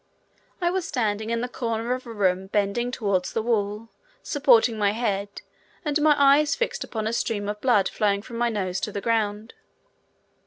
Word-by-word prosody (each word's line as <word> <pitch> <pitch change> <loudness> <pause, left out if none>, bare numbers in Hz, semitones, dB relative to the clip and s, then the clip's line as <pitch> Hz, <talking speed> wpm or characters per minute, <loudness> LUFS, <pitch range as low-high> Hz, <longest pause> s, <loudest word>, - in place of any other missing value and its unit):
I 345 -1 +1
was 370 -2 -2
standing 220 -4 -1
in 230 0 -1
the 245 - -2
corner 235 -1 -2
of 255 0 -6
a - - -7
room 190 -3 0
bending 205 +4 0
towards 200 -7 -1
the 225 - 0
wall, 215 -1 -1 0.3
supporting 250 -6 +4
my 205 -1 +2
head, 200 -3 -3 0.4
and 295 0 +1
my 300 -1 +5
eyes 285 +3 +5
fixed 485 - -2
upon 220 -2 -4
a 220 - -1
stream 210 -3 -1
of 210 0 -4
blood 215 -7 +3
flowing 200 -1 0
from 235 0 -8
my 240 0 +2
nose 190 -4 -2
to 210 - -3
the 200 - -4
ground. 215 0 -1
225 Hz, 185 wpm, -25 LUFS, 205-245 Hz, 0.4 s, my